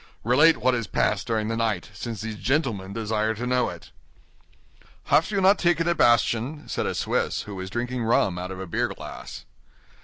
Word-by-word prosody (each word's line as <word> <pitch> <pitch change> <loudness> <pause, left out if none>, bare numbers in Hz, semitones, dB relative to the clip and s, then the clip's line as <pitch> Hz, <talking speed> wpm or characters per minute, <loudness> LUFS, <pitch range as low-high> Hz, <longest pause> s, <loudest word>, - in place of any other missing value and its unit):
Relate 145 +8 +5
what 130 0 +2
has 115 -4 -2
passed - - 0
during 110 -2 0
the 115 - -1
night, 110 -4 -1
since 115 0 -6
these 110 0 -4
gentlemen 110 -6 -1
desire 110 0 -1
to 120 +4 -4
know 125 0 +1
it." - - -11 1.1
"Have 165 - +3
you 200 -2 0
not 195 +2 +5
taken 170 -1 +2
a 170 - +3
bastion?" 120 +2 +2
said - - -2
a - - -2
Swiss, - - -1
who 105 - -8
was 95 -1 -6
drinking 120 +3 -3
rum 105 -5 +2
out 90 +1 -5
of 95 0 -7
a 95 - -5
beer 85 - 0
glass. - - -9
115 Hz, 190 wpm, -25 LUFS, 105-130 Hz, 1.1 s, Relate